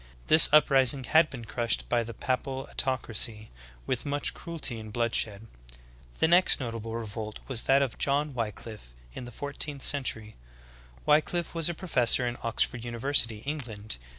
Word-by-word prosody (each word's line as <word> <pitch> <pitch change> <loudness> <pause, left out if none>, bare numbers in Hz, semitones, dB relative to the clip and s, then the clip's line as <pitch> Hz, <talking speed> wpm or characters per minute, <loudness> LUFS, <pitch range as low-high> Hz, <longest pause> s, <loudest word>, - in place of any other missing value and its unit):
This 155 0 +9
uprising 135 -3 +5
had 160 +5 +3
been 120 -3 -9
crushed 115 -2 -1
by 120 -1 0
the 115 0 -9
papal 130 0 -3
autocracy 115 -4 -2 0.3
with 130 -2 -3
much 145 0 -1
cruelty 155 -9 -5
and 110 -1 -10
bloodshed. 115 -2 -1 0.7
The - - +2
next 175 +3 +4
notable 115 -3 -5
revolt 110 -1 -6
was 125 -4 -2
that 135 +1 +4
of 130 - -5
John 145 +1 0
Wickliflfe 110 - -7 0.2
in 125 - -8
the 120 - -10
fourteenth 140 +2 -3
century. 115 -6 -1 0.7
Wickllffe 155 +3 +1
was 165 -1 -1
a 170 - -4
professor 125 -8 +2
in 120 0 -3
Oxford 115 +1 -1
university, 120 -2 0
England. 115 - -5
125 Hz, 150 wpm, -27 LUFS, 115-145 Hz, 0.7 s, This